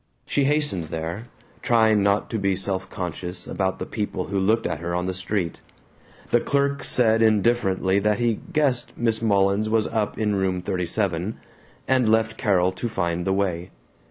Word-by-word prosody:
She 140 - +1
hastened 145 - +1
there, 80 +8 -5 0.3
trying 110 -4 +3
not 100 +1 +2
to 110 - -1
be 100 -1 +1
self 95 0 -3
conscious 90 0 -5
about 95 0 -1
the - - -4
people 105 -2 -3
who 100 0 0
looked 110 +4 +2
at - - -2
her 85 +1 -3
on 90 0 -1
the 95 - -2
street. 95 -2 -3 0.7
The 120 - +5
clerk 140 +2 0
said 115 -2 +2
indifferently 100 -3 +2
that 105 +1 +1
he 120 -3 0
"guessed" 140 -6 +1
Miss 115 -2 0
Mullins 100 -1 +2
was 110 -1 +2
up 110 -2 -2
in 105 -1 0
Room 95 -1 0
37, 90 +1 -2 0.5
and 130 -4 +3
left 110 0 +2
Carol 95 -5 +2
to 95 +6 -4
find 85 -3 -2
the 95 - +2
way. 90 -2 -1
100 Hz, 170 wpm, -24 LUFS, 95-115 Hz, 0.7 s, The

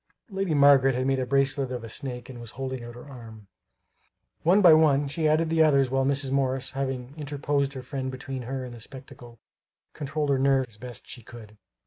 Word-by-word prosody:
Lady 195 -4 -1
Margaret 140 -2 +5
had 130 +1 -1
made 135 0 +1
a 130 - -2
bracelet 135 0 +1
of 125 -2 -5
a - - -7
snake 125 +1 -7
and 125 -3 -10
was 115 - -9
holding 130 -2 -4
out 120 0 -9
her 120 - -11
arm. 115 -5 -12 1.0
One 180 +5 +4
by 175 -5 +8
one 145 -3 +4
she 155 +3 -1
added 160 +1 +2
the 165 0 +3
others 140 -4 +4
while 135 0 +1
Mrs. 140 -1 0
Morris, 135 -1 -1
having 135 -1 -4
interposed 145 -1 -2
her 130 -2 -7
friend 130 0 -4
between 130 0 -6
her 130 +2 -5
and 125 - -9
the 120 - -11
spectacle, 130 -1 -12 0.6
controlled 145 0 -2
her 135 - +2
nerves 135 -2 +2
as 105 - -13
best 120 0 -9
she 120 - -9
could. 110 -2 -13
135 Hz, 205 wpm, -26 LUFS, 125-140 Hz, 1.0 s, by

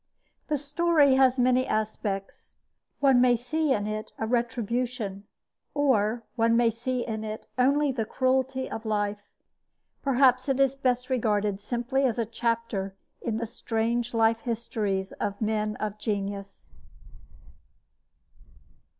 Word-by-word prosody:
The 300 - +1
story 295 0 +3
has 260 -1 +4
many 255 +1 +3
aspects. 210 -2 -3 0.5
One 270 -3 +5
may 250 -1 +5
see 290 +6 -1
in 205 -5 +1
it 215 0 -4
a 220 - -2
retribution, 235 -3 -2 0.5
or 235 -5 +2
one 230 0 +3
may 235 -1 +4
see 245 +2 -2
in 220 -1 -4
it 215 0 -6
only 280 +3 +3
the 240 -4 -1
cruelty 260 +2 0
of 225 - -6
life. 205 -2 -1 0.8
Perhaps 260 -1 +3
it 270 0 +1
is 275 -1 +3
best 255 -1 0
regarded 210 -5 +1
simply 245 +4 -1
as 250 -4 +1
a 230 - 0
chapter 225 -4 -2 0.3
in 225 -2 -2
the 230 - -2
strange 230 +1 -2
life 225 0 +3
histories 215 -5 -2
of 200 0 -2
men 215 -1 0
of 210 -1 -4
genius. 200 -2 -4
235 Hz, 130 wpm, -27 LUFS, 215-255 Hz, 0.8 s, One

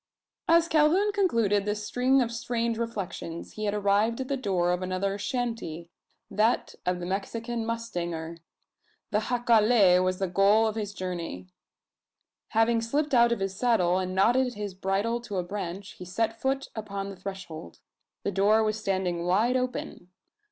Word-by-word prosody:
As 335 0 +5
Calhoun 335 +7 +3
concluded 230 - +2
this 210 0 -2
string 255 +3 +3
of 235 - -4
strange 230 0 -2
reflections, 195 -7 -5
he 215 - -5
had 205 0 0
arrived 210 +3 +2
at 260 0 -4
the 275 - +1
door 185 -9 0
of 180 +1 -1
another 185 +2 -2
"shanty" 210 -9 -3 0.4
that 220 +4 +1
of 180 0 +1
the 175 - -5
Mexican 225 +5 -3
mustanger. 170 -8 -4 0.7
The 210 - +2
jacale 220 -5 +4
was 185 0 0
the 190 - -1
goal 200 +4 +4
of 220 - 0
his 205 -2 -4
journey. 170 - -5 1.0
Having 225 +1 +2
slipped 290 +6 -1
out 235 -1 +5
of 235 - -1
his 195 0 -2
saddle, 190 -6 +2
and 185 0 -3
knotted 245 +5 +3
his 205 -2 -5
bridle 200 +5 -1
to 210 -5 -5
a 180 - 0
branch, 195 +1 -5
he 180 - -7
set 225 +5 -2
foot 270 +1 -1
upon 200 -2 -5
the - - -9
threshold. 185 - -8 0.5
The 200 - -1
door 205 +3 +3
was 215 0 -1
standing 185 -4 -1
wide 220 +8 +3
open. 250 -8 -3
210 Hz, 160 wpm, -27 LUFS, 185-235 Hz, 1.0 s, As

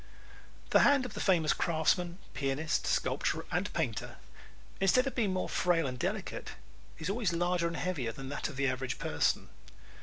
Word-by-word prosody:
The - - +7
hand 280 -2 +5
of 250 - -6
the - - -6
famous 165 -5 +3
craftsman, 170 +2 +1 0.2
pianist, 135 +4 -1
sculptor - - 0
and - - 0
painter, - - -2 0.6
instead 225 +7 +4
of 270 - -2
being 215 -6 +1
more 185 - -1
frail 170 -3 +2
and 125 -2 -4
delicate, - - -3 0.4
is 160 - -5
always 200 -2 0
larger 175 0 +1
and 170 0 -4
heavier 155 -11 -1
than 135 +3 -8
that 145 - -3
of 155 - -8
the 140 +1 0
average 130 -2 -1
person. 75 - 0
170 Hz, 170 wpm, -32 LUFS, 135-185 Hz, 0.6 s, The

